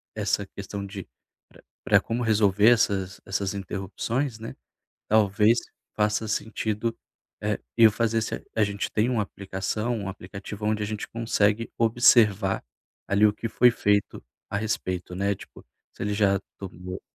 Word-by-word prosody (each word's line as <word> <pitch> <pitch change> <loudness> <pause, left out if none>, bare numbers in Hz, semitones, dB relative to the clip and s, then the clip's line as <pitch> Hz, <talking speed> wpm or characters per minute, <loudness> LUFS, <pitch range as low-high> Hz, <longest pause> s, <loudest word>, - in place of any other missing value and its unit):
essa - - 0
questão 100 -1 -6
de 95 -1 -8 0.4
pra - - -19 0.2
pra, - - +4
como 120 +2 -2
resolver 105 -1 +4
essas 100 -5 +1
essas 95 +1 -2
interrupções, 110 +6 -3
né, 115 - -7 0.5
talvez 105 +2 +4 0.4
faça 105 +1 +1
sentido, 110 +1 -2 0.4
eh, 105 0 -1 0.2
eu 115 -2 +8
fazer 115 0 0
se - - -3
a - - -9 0.2
a 110 - +4
gente 100 0 -3
tem 110 +3 +1
uma 115 -4 +1
aplicação 100 +4 -3
um 100 -2 -4
aplicativo 100 +2 -8
onde 105 0 0
a - - -1
gente 105 -1 -4
consegue 115 -1 +1
observar 110 -4 +4 0.4
ali 100 +2 +4
o 105 - +3
que 115 +2 -5
foi 125 +2 +5
feito 105 -3 0 0.2
a - - -3
respeito, 95 -4 -3
né, 100 +2 0
tipo - - -14 0.3
se - - -9
ele 105 0 -1
já 100 -2 +2 0.2
tomou,, 90 -1 -7
105 Hz, 155 wpm, -26 LUFS, 100-110 Hz, 0.5 s, eu